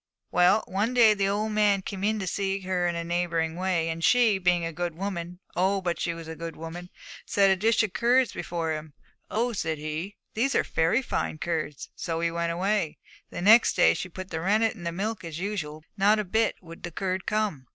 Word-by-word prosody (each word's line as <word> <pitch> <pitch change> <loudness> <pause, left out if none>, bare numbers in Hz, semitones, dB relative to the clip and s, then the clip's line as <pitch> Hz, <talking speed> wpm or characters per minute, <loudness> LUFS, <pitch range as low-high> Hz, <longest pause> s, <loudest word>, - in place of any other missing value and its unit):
'Well, 180 +5 +4
one 210 +6 -1
day 225 -3 +7
the 200 -1 0
old 210 +2 0
man 205 -2 +2
came 195 0 -6
in 215 +1 +2
to 195 - -3
see 195 +1 -1
her 185 -1 0
in 170 - -1
a 170 - -2
neighbouring 170 -1 -1
way, 180 -2 0
and 165 0 -4
she, 230 -4 +4
being 175 -2 +2
a 165 - -4
good 175 0 -3
woman, 180 -2 -4 0.2
oh, 190 +3 +2
but 175 -2 -2
she 170 - -1
was 165 -1 -9
a 160 - -6
good 165 0 -6
woman! 170 +2 -8 0.3
set 195 -1 +3
a - - +4
dish 220 +4 +2
of 205 -4 -3
curds 245 +1 +3
before 165 -2 -3
him. 155 -1 -7 0.4
"Oh," 235 +3 0
said 160 -6 -2
he, 155 +7 -5 0.2
"these 265 +5 0
are - - +3
very 165 +11 +1
fine 155 - -2
curds!" 155 -4 -3
So 165 -1 -3
he 170 0 0
went 170 0 -1
away, 185 -1 0 0.3
and 175 - -4
next 225 +3 +7
day - - +5
she 185 - -5
put 185 +2 -8
the 160 -1 -3
rennet 215 +5 +2
in 185 -7 -10
the 170 - -1
milk 205 +5 -3
as 165 -2 -6
usual, 170 -6 -4
but 195 - -4
not 210 +2 +6
a 210 - 0
bit 220 +4 +1
would 165 0 -11
the 175 - -5
curd 185 +2 -3
come. 210 - -1
185 Hz, 225 wpm, -27 LUFS, 165-210 Hz, 0.4 s, day